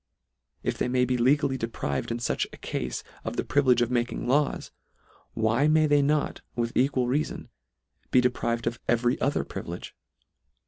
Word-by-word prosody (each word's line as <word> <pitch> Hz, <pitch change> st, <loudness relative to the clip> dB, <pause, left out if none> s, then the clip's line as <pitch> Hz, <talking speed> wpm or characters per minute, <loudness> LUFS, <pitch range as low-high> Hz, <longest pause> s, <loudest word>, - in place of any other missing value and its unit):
If -, -, -2 dB
they -, -, +1 dB
may 125 Hz, 0 st, +2 dB
be 125 Hz, 0 st, 0 dB
legally 135 Hz, +2 st, +2 dB
deprived 70 Hz, -, -3 dB
in 115 Hz, -, -1 dB
fuch 120 Hz, -, -1 dB
a -, -, -11 dB
cafe 65 Hz, -1 st, -4 dB, 0.2 s
of -, -, -4 dB
the -, -, +1 dB
privilege 130 Hz, -4 st, +3 dB
of 120 Hz, -, -2 dB
making 120 Hz, 0 st, -1 dB
laws, 140 Hz, +3 st, +1 dB, 0.6 s
why 115 Hz, +6 st, +2 dB
may 155 Hz, 0 st, +4 dB
they 145 Hz, -1 st, +4 dB
not, 150 Hz, +1 st, 0 dB
with 120 Hz, -1 st, -2 dB
equal 130 Hz, -1 st, +2 dB
reafon, 140 Hz, +5 st, -2 dB, 0.6 s
be 125 Hz, -, +5 dB
deprived 120 Hz, -2 st, 0 dB
of 115 Hz, 0 st, -2 dB
every 120 Hz, +1 st, +1 dB
other 140 Hz, -, +1 dB
privilege -, -, -7 dB
125 Hz, 165 wpm, -27 LUFS, 120-140 Hz, 0.6 s, be